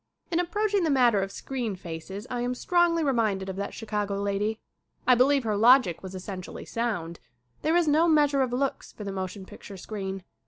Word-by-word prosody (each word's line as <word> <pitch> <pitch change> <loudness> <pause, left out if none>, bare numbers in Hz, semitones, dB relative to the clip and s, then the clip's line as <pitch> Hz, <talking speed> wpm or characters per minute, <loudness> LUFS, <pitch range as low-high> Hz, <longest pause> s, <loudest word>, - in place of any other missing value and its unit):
In 340 - +2
approaching 405 +2 +1
the 325 - +1
matter 245 -7 +4
of 195 0 -3
screen 245 -5 -4
faces 180 +4 -7
I 245 -1 -3
am 245 +1 -1
strongly 345 +3 +2
reminded 215 -8 0
of 190 - -4
that 200 - -4
Chicago 210 -3 -2
lady. 205 +2 -1 0.5
I 255 - +6
believe 265 +2 +4
her 215 -2 0
logic 230 -4 +5
was 190 0 -8
essentially 185 0 -7
sound. 200 -8 -3 0.4
There 315 +2 +1
is 345 -2 +2
no 310 +3 +4
measure 295 -3 +4
of 255 -2 0
looks 270 +2 -2
for 210 - -9
the 200 - -4
motion 190 0 -5
picture 195 +1 -11
screen. 195 -1 -5
225 Hz, 190 wpm, -27 LUFS, 195-275 Hz, 0.5 s, I